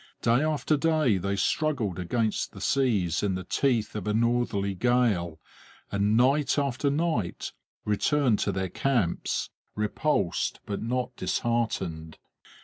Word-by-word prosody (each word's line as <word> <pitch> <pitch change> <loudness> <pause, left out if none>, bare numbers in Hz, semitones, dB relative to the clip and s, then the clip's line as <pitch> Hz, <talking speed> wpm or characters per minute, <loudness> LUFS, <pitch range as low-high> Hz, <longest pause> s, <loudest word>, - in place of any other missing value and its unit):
Day 120 +3 +4
after 155 0 +1
day 155 -8 +2
they 100 +2 -1
struggled 115 - 0
against 110 +5 -1
the - - -10
seas 105 -11 +1
in 100 -2 0
the 95 - -4
teeth 115 +2 0
of 105 -1 -4
a 105 - +1
northerly 115 -4 +1
gale, 100 -7 +1 0.5
and 100 +2 +2
night 135 +4 +3
after 140 0 0
night 145 - -1 0.3
returned 120 +2 +2
to 100 - 0
their 95 -1 -2
camps, 115 -5 -1 0.2
repulsed 105 - 0
but 100 - -4
not 125 +2 -2
disheartened. 95 -7 -2
115 Hz, 130 wpm, -27 LUFS, 100-135 Hz, 0.5 s, Day